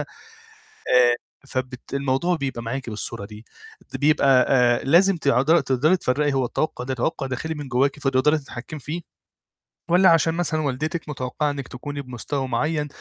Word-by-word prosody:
آآ، - - -4 1.4
فبت 130 0 -5
الموضوع 140 +6 0
بيبقى 135 -6 -4
معاكِ 120 +1 -4
بالصورة 105 0 -5
دي. 105 +1 -12 0.5
بيبقى، 135 -2 +4
آآ، 125 -2 +3
لازم 175 +6 +4
ت - - -2 0.4
تقدري 145 +8 +3
تفرّقي 145 -1 0
هو 135 -1 +1
التوقع 125 +1 -2
ده 130 - -2
توقع 135 +3 -2
داخلي 145 +5 -4
من 145 -3 -7
جواكِ 135 +3 +1
فتقدري 135 +3 +2
تتحكمي 140 +2 -8
فيه، 155 +6 -5 0.9
والّا 180 +2 +6
عشان 165 0 +3
مثلًا 165 -2 -1
والدتِك 155 +3 -3
متوقعة 145 +2 -2
إنِك 140 -2 -6
تكوني 145 +3 -6
بمستوى 130 +2 -4
معين 150 +5 -1
140 Hz, 150 wpm, -23 LUFS, 125-155 Hz, 1.4 s, والّا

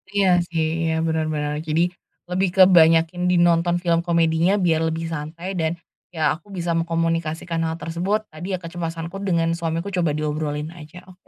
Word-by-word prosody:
Iya 190 -3 +4
sih, 165 -2 -1 0.2
iya 160 - +1
bener 160 -1 0
bener. 150 -1 -2
Jadi 160 +2 +2 0.5
lebih 185 +1 +1
ke 190 - +8
banyakin 165 0 +4
di - - +3
nonton 170 0 +3
film 170 -1 +2
komedinya 170 +1 +2
biar 170 -4 +2
lebih 160 +1 -3
santai 165 +4 -5
dan 160 -1 +1 0.4
ya 155 -2 +2
aku 165 +5 -18
bisa 175 -1 -1
mengkomunikasikan 165 0 -1
hal 160 - -2
tersebut. 180 +7 -1
Tadi 175 +5 -4
ya - - -3
kecemasanku 165 +1 -5
dengan 165 -2 +1
suamiku 170 +3 -2
coba 175 -4 +1
diobrolin 150 0 -3
aja. 175 +1 -12
Oke 180 +1 -23
165 Hz, 170 wpm, -22 LUFS, 160-175 Hz, 0.5 s, ke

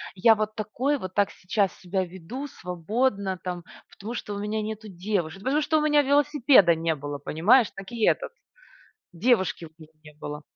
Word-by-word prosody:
"Я 220 +4 +5
вот 215 0 -3
такой 245 +7 -1
вот, 185 -7 -7
так 205 0 +2
сейчас 195 +1 -1
себя 190 +1 -1
веду 190 - -7
свободно 195 - -2
там, 180 -1 -4 0.3
потому 215 +4 -7
что 210 -3 -5
у - - -4
меня 210 +1 -2
нету 215 0 -6
девушек". 190 -1 -3
"Потому 280 +5 +1
что 315 +1 +1
у - - +2
меня 295 -1 +4
велосипеда 285 - +4
не 165 0 -1
было", 145 0 -6
понимаешь? 205 - +4
Так 195 -1 -9
и 235 -2 -3
этот- - - +2 0.8
девушки 190 -2 +1
у 160 +1 -17
него 155 0 -14
не 150 -1 -14
было. 150 0 -7
200 Hz, 180 wpm, -26 LUFS, 175-245 Hz, 0.8 s, Я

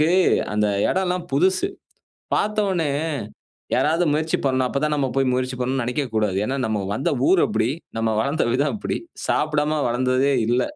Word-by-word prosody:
நமக்கு 155 - +4 0.5
அந்த 105 0 +2 0.2
எடம் 190 0 0
எல்லாம் 180 -1 -2
புதுசு. 185 +6 +2 0.7
பார்த்தவுனே 195 -7 0 0.8
யாராவது 165 +4 +2
முயற்சி 155 +2 0
பண்ணா, 130 -1 +2
அப்பதான் 150 +3 0
நம்ம 140 -2 0
போயி 135 -1 +2
முயற்சி 130 0 -1
பண்ணனும்னு 130 +1 -1
நெனைக்கவே 125 +3 -2
கூடாது. 105 -3 +1
ஏன்னா 130 +5 -2
நம்ம 110 -1 -1 0.2
வந்த 130 - 0 0.2
ஊர் 185 - +5
அப்டி, 110 +2 0 0.3
நம்ம 115 0 +1
வளர்ந்த 140 +7 0
விதம் 140 +4 +1
அப்டி. 205 - -3 0.3
சாப்டாம 150 0 +1
வளர்ந்ததே 130 +3 +1
இல்ல. 120 +2 +2
140 Hz, 155 wpm, -22 LUFS, 125-155 Hz, 0.8 s, ஊர்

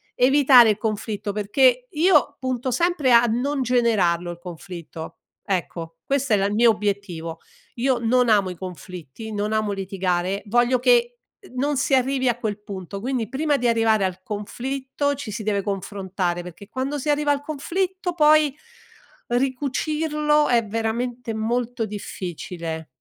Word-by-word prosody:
evitare 255 -2 +6
il 205 - -2
conflitto 215 -1 -3
perché 250 +4 +2
io 300 -3 +3
punto 255 -1 -2
sempre 325 -2 +1
a 235 0 +7
non 260 +5 0
generarlo 210 -9 +2
il 170 - -8
conflitto 170 -2 -9 0.3
ecco, 170 -4 -3
questo 275 -4 0
è - - +7
la 195 - +1
il 205 - -2
mio 230 +2 +5
obiettivo 200 -6 -3 0.4
io 255 0 +1
non 245 +2 +2
amo 200 -3 +3
i 180 - -6
conflitti, 180 +2 -8
non 210 +1 -1
amo 215 -1 0
litigare, 190 -1 -1
voglio 240 +3 +3
che, 240 -1 +3 0.2
uhm, - - -16
non 285 +2 0
si 275 0 +2
arrivi 260 0 +1
a 240 - 0
quel 215 -4 -3
punto, 195 -1 -7
quindi 245 -2 -2
prima 295 +2 0
di 245 - 0
arrivare 225 -2 +3
al 185 0 -2
conflitto 265 +7 -3
ci 265 -6 -7
si 215 +2 -5
deve 200 -1 0
confrontare 190 -3 -3
perché 180 +3 -11
quando 270 +3 -3
si 295 - -3
arriva 295 0 +2
al 285 0 0
conflitto 355 +5 -2
poi 305 -3 +4 0.8
ricucirlo 300 +4 +1
è 235 -2 +3
veramente 230 +2 -3
molto 235 +1 -1
difficile. 170 -5 -6
230 Hz, 150 wpm, -23 LUFS, 200-265 Hz, 0.8 s, a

